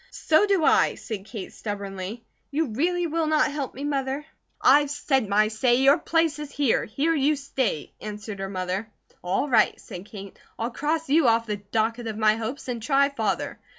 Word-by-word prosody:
"So 320 +6 +2
do 385 -6 +2
I," - - +4
said 210 -4 -6
Kate, 215 -4 -8
stubbornly. 200 +1 -6 0.2
"You 300 0 -1
really 345 +10 0
will 325 0 -1
not 305 -2 +2
help 280 -3 -4
me, 275 - -6
Mother?" 275 0 -2 0.3
"I've 290 +1 +5
said 270 -6 0
my 210 +1 +4
say! 240 +3 +2
Your 275 +5 +5
place 325 -3 +1
is 300 -1 -6
here! 280 -5 +1
Here 290 +9 0
you 300 0 +2
stay!" 265 - -2
answered 210 -1 -7
her 195 0 -4
mother. 185 +3 -3 0.3
"All 185 +10 0
right," 230 -6 +3
said 180 +2 -9
Kate, 200 -2 -10 0.2
"I'll 230 +2 -2
cross 310 +5 -1
you 295 0 +4
off 230 0 +3
the 210 -2 -3
docket 225 +3 -2
of 215 -1 -4
my 215 -1 +4
hopes, 230 +6 -5
and 240 -2 -3
try 275 +4 +3
Father." 280 - -2
250 Hz, 185 wpm, -25 LUFS, 215-290 Hz, 0.3 s, I've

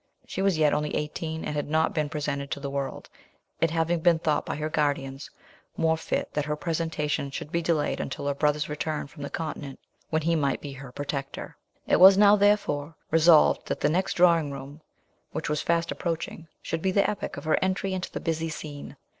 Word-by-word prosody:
She - - -4
was 195 -4 +2
yet 155 -2 +4
only 150 0 -1
eighteen, 160 +1 -3
and 150 - -3
had 145 0 -2
not 160 +1 +2
been 150 -2 0
presented 145 -2 -3
to - - -3
the 140 -1 -5
world, 140 -1 -4 0.5
it 165 - +3
having 165 +1 +1
been 170 0 +4
thought 155 -2 0
by - - -2
her 155 +1 -2
guardians 140 -2 -1 0.5
more 160 0 +3
fit 160 - -3
that 150 -1 -1
her 150 0 -1
presentation 155 -3 -2
should 145 +2 -6
be 170 - 0
delayed 160 -3 0
until 135 - -4
her 140 - +1
brother's 150 +1 +1
return 150 +1 -3
from 145 +1 -13
the 140 - -4
continent, 150 -4 -5 0.3
when 160 -1 0
he 165 +1 +2
might 140 -3 +1
be 145 - -7
her 135 -1 -10
protector. 140 0 -5 0.3
It - - +3
was 190 +1 +9
now, 205 0 +7
therefore, 195 -7 +1 0.2
resolved 165 0 +5
that - - -3
the - - +3
next 185 +5 0
drawing 170 -4 +4
room, 140 +2 -9 0.5
which - - -3
was 150 0 0
fast 170 0 0
approaching, 165 -1 -4 0.2
should 165 - -3
be 190 - +1
the 200 +1 +3
epoch 210 - -4
of - - -6
her 155 - +2
entry 190 0 0
into 185 -1 -4
the - - -4
"busy 165 -1 -2
scene." 150 -2 -8
155 Hz, 205 wpm, -27 LUFS, 145-165 Hz, 0.5 s, was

